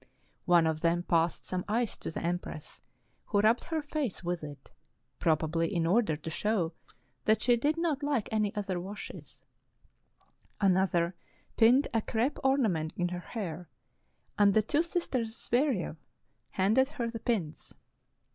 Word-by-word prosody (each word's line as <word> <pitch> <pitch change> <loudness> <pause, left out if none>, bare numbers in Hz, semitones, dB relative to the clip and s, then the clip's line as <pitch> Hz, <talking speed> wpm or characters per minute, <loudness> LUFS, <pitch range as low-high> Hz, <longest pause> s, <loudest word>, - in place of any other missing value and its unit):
One 175 -2 +5
of 160 -1 0
them 170 +1 +2
passed 165 -1 +1
some 180 -1 -2
ice 225 +2 0
to - - -5
the 160 - -5
empress, 170 -3 -4 0.4
who 205 - +1
rubbed 220 +3 +3
her 320 -2 -2
face 290 -10 -3
with 175 -1 -2
it, 145 -2 -10 0.5
probably 165 +1 +1
in 170 -4 0
order 180 -3 +2
to 160 - -7
show 185 -3 0 0.5
that 215 - +3
she 245 -1 +5
did 290 +7 0
not 325 -4 0
like 285 -6 0
any 215 -2 +1
other 195 -3 -2
washes; 195 +4 -9 1.2
another 185 -3 +2 0.4
pinned 245 +5 +5
a 225 - +2
crepe 235 +7 -1
orna 265 -3 +3
ment 160 -3 -2
in 175 0 0
her 180 0 -4
hair, 180 -4 -6 0.7
and 200 -1 +5
the 220 - +5
two 295 +8 +2
sisters 265 -10 -2
Zvyerev 240 - 0 0.5
handed 220 +8 +3
her 235 -6 -3
the 230 - -5
pins. 200 -11 -3
205 Hz, 150 wpm, -30 LUFS, 170-240 Hz, 1.2 s, One